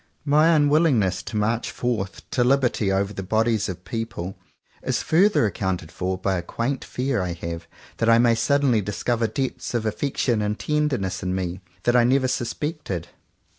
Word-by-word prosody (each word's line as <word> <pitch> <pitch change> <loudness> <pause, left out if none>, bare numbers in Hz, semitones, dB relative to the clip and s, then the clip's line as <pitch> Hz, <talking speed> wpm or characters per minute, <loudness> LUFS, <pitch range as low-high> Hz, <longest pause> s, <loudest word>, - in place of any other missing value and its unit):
My 150 +2 +4
unwillingness 145 - +3
to 110 - -5
march 110 +3 0
forth 110 -6 -3
to 125 - +2
liberty 125 -6 +2
over 100 +1 0
the 95 - -5
bodies 110 +2 +1
of 90 +1 -7
people, 110 -5 -4 0.5
is - - -1
further 190 - +4
accounted 95 -4 -2
for 95 +1 -2
by 95 0 0
a - - -2
quaint 120 +9 -3
fear 125 -3 -1
I 90 -1 -2
have 85 -1 -6 0.3
that 115 - +1
I 115 - +7
may 120 0 +5
suddenly 135 -1 +2
discover 115 +4 -1
depths 130 +2 -3
of 115 -2 0
affection 120 0 0
and 105 +1 -1
tenderness 140 -12 -1
in 90 0 -2
me 90 0 -3 0.2
that 120 - +2
I 120 - +6
never 130 +2 +3
sus 120 -2 -1
pected. 145 - -4
115 Hz, 170 wpm, -24 LUFS, 95-130 Hz, 0.5 s, I